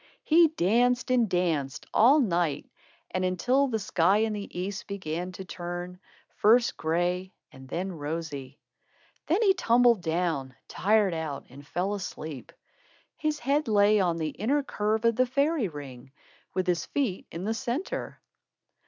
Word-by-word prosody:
He 330 +1 +6
danced 245 - +1
and 240 -4 +3
danced, 160 -7 -1
all 265 +7 +6
night 170 - 0 0.4
and 185 - -1
until 245 +10 +2
the 230 -4 -1
sky 195 -2 +2
in 220 0 +1
the 200 -3 -6
east 195 +2 -4
began 180 -2 -4
to 190 +1 -8
turn, 175 0 -6 0.4
first 235 +3 +4
gray 175 +3 -1 0.2
and 130 0 -14
then 185 +6 -3
rosy. 145 -4 -5 0.7
Then 370 +8 +2
he 390 -3 +5
tumbled 240 - +4
down, 160 -6 -1
tired 205 -2 +2
out, 160 -4 -4
and 140 +2 -13
fell 185 +6 -1
asleep. 160 -8 -6 0.6
His 305 -1 -1
head 285 +2 0
lay 210 0 +4
on 175 -3 +1
the 160 -2 -1
inner 270 - 0
curve 215 -2 -1
of 230 -1 +3
the 255 0 +3
fairy 280 -1 +1
ring, 135 -5 -10 0.4
with 185 -1 0
his 175 -2 0
feet 250 -10 -2
in 170 - -6
the 220 +3 0
centre. 260 +8 -4
190 Hz, 150 wpm, -27 LUFS, 165-240 Hz, 0.7 s, He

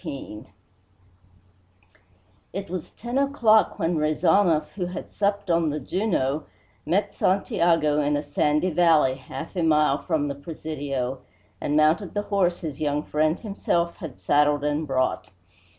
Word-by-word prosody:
XIX 110 -7 -7 2.1
It 195 0 -5
was 180 -3 -5
ten 240 +4 -3
o'clock 240 -6 +3
when 165 0 0
Rezanov, 160 +2 +2
who 180 -3 -4
had 180 - -7
supped 200 -2 -1
on 165 -1 +2
the 150 +1 -2
Juno, 155 - -1 0.4
met 200 +5 +1
Santiago 165 -5 +2
in 145 0 +1
a 145 - -3
sandy 150 +4 +1
valley 160 -5 +4
half 135 +7 -8
a 180 - 0
mile 150 -3 +3
from 155 -4 -1
the 140 - -2
Presidio 140 -3 -4 0.4
and 150 - 0
mounted 160 +6 +2
the 205 - 0
horse 180 -3 +1
his 155 -2 -6
young 150 0 0
friend 155 +3 0
himself 175 -5 -1
had 155 -6 -8
saddled 145 0 +2
and 150 +1 -1
brought. 130 -1 0
160 Hz, 140 wpm, -25 LUFS, 145-185 Hz, 2.1 s, valley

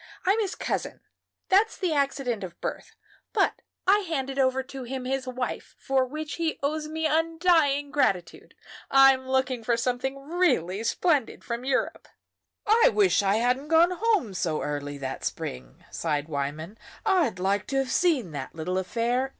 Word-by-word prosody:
I'm 395 +4 +3
his 410 -3 -1
cousin - - -3 0.5
that's 410 +4 +3
the 360 -5 0
accident 275 -6 -1
of 175 -2 -8
birth; - - -5 0.4
but - - +1 0.2
I 400 +2 +5
handed 275 -8 -3
over 265 0 +2
to 265 +1 -9
him 255 +1 -5
his 260 0 -2
wife, 255 0 -4
for 265 -1 +1
which 305 +2 -5
he 330 -2 -1
owes 305 +2 -1
me 320 +1 -3
undying 320 -3 +2
gratitude. 190 -11 -1 0.3
I'm 270 -1 +6
looking 260 -2 0
for 235 +1 +1
something 250 +3 -1
really 250 - +1
splendid 295 -3 +1
from 235 0 -4
Europe." 265 -1 -1 0.6
"I 450 +3 +5
wish 390 - +3
I 200 0 +2
hadn't 250 +5 +1
gone 330 +3 +5
home 375 - +1
so 165 -4 -1
early 145 -1 -4
that 135 -1 -5
spring," 65 -1 -6
sighed 150 -2 -2
Wyman. 155 +6 -4 0.3
"I'd 325 - +2
like 195 +2 0
to 275 - -3
have 270 -1 0
seen 290 - +2
that 140 -1 -6
little 180 +4 -2
affair. 240 +7 -1
265 Hz, 160 wpm, -26 LUFS, 205-315 Hz, 0.6 s, I'm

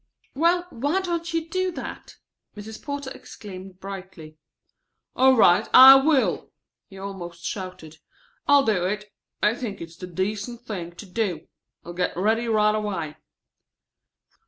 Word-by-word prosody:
"Well, 340 +5 +2
why 290 +10 -1
don't 340 -2 -3
you 330 -1 -2
do 370 +2 -1
that?" - - -8 0.4
Mrs. 215 +1 -9
Porter 285 -2 -5
exclaimed 190 -2 -11
brightly. 190 -5 -9 0.8
"All 260 0 +5
right, 175 -5 +5
I 265 +1 +12
will!" 270 -1 +1 0.4
he 195 - -14
almost 180 -3 -8
shouted. 180 -5 -7 0.5
"I'll 285 -1 +6
do 185 -5 +1
it. 210 +2 -4 0.3
I 210 - +4
think 225 -5 -6
it's 165 0 -10
the 180 - -8
decent 205 +6 -4
thing 175 -7 -6
to 205 - -10
do. 185 -4 -3 0.4
I'll 175 - -7
get 180 -1 -2
ready 220 +5 +1
right 210 -1 +3
away." 190 -8 -3
210 Hz, 135 wpm, -24 LUFS, 185-265 Hz, 0.8 s, I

